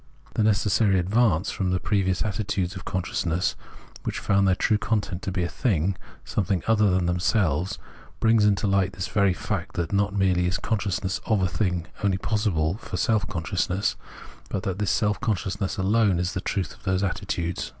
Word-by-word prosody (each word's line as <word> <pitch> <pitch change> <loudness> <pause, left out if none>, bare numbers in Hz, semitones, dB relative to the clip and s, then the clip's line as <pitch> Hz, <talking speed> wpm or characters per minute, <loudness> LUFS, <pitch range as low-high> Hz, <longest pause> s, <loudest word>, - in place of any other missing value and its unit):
The 115 - 0
necessary 105 -1 +3
advance 95 -1 +2
from 95 -2 -1
the 90 0 +1
previous 95 -3 +1
attitudes 100 -2 -2
of 90 - -8
con 95 -1 -2
sciousness, 85 +1 0 0.5
which - - -3
found 100 -1 +2
their 95 - +4
true 105 +2 +2
content 100 -5 -1
to 95 - -3
be 90 -1 -1
a - - 0
thing, 95 - 0 0.3
something 95 -3 -1
other 105 -2 +4
than 90 -1 +2
themselves, 90 - +1 0.4
brings 115 -1 +4
to 105 - +6
hght 100 -1 +2
this 90 0 -4
very 100 -3 +2
fact - - -4
that 85 +1 -2
not 100 0 +1
merely 90 -2 +2
is 95 +4 0
consciousness 100 -3 -1
of 105 -4 +2
a - - +3
thing 90 -2 -1 0.2
only 100 -2 +2
possible 95 -6 0
for - - -7
a - - -1
self 110 -3 +1
consciousness, 90 +1 -1 0.5
but 95 - -3
that 95 -2 -2
this 105 -3 0
self 105 -1 +1
consciousness 100 -4 -1
alone 100 0 +3
is 90 +1 -1
the 90 - -2
truth 95 -2 -2
of - - -19
those 95 -1 0
attitudes. 85 -2 -2
95 Hz, 185 wpm, -25 LUFS, 90-105 Hz, 0.5 s, to